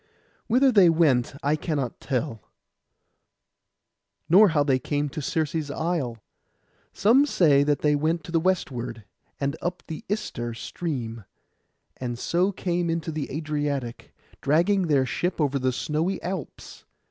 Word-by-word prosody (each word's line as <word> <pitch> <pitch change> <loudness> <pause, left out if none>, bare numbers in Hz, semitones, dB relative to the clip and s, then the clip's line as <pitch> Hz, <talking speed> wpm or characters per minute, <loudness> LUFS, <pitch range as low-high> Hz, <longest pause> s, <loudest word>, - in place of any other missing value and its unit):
Whither 255 +3 +4
they 195 -6 +6
went 145 -7 +2
I 145 +2 +2
cannot 145 -6 -3
tell, 130 -4 -2 1.9
nor 200 +6 +7
how 150 -3 +2
they 135 -2 +2
came 145 +2 -1
to 155 +2 -5
Circe's 155 +1 -1
isle. 145 -6 -2 0.7
Some 255 +8 +4
say 150 - +4
that 145 -1 +1
they 150 -1 +3
went 160 +3 0
to 170 - -9
the 165 - +3
westward, 130 - -2 0.4
and 140 +1 -1
up 175 +1 -3
the 160 -2 -7
Ister 120 - -3
{130a} - - -10
stream, 115 - -5 0.7
and 120 -2 -4
so 180 +9 +1
came 175 -2 -1
into 165 0 -2
the 155 -2 -4
Adriatic, 145 -5 -3 0.3
dragging 175 +6 +2
their 140 -4 +3
ship 175 +7 -2
over 140 -2 +1
the 130 0 +1
snowy 160 +8 -1
Alps. 180 -4 -6
155 Hz, 140 wpm, -25 LUFS, 135-175 Hz, 1.9 s, nor